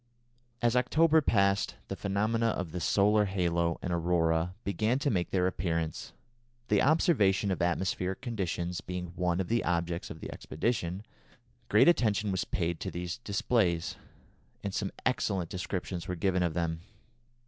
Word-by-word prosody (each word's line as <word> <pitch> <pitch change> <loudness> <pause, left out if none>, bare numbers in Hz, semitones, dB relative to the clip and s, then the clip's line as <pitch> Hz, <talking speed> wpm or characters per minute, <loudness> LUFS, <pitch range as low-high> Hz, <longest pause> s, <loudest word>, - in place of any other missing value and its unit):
As 120 0 +3
October 155 +6 +4
passed 100 -6 +2
the - - -4
phenomena 110 +4 0
of 95 -7 -2
the 90 - -4
solar 105 +4 +3
halo 85 -3 0
and 90 - -1
aurora 85 0 +1
began 110 +5 +1
to 140 +1 0
make 90 -4 0
their 90 -2 +1
appearance. 85 -3 -2 0.6
The 105 - +4
observation 105 - +3
of 95 - -2
atmospheric 90 +1 0
conditions 90 -7 -3
being 90 -1 -5
one 90 -1 0
of 95 - -1
the 115 +1 +1
objects 85 0 -1
of - - -8
the - - -7
expedition, 95 0 -2 0.6
great 105 - +5
attention 105 - +3
was 95 -1 -1
paid 85 -2 -2
to - - -3
these 90 +4 -5
displays, 100 -5 0 0.7
and 100 - -3
some 100 -1 -2
excellent 100 -9 0
descriptions 90 -1 -4
were 90 - -2
given 90 +1 +1
of 85 -3 0
them. 80 -2 -1
95 Hz, 150 wpm, -30 LUFS, 85-105 Hz, 0.7 s, great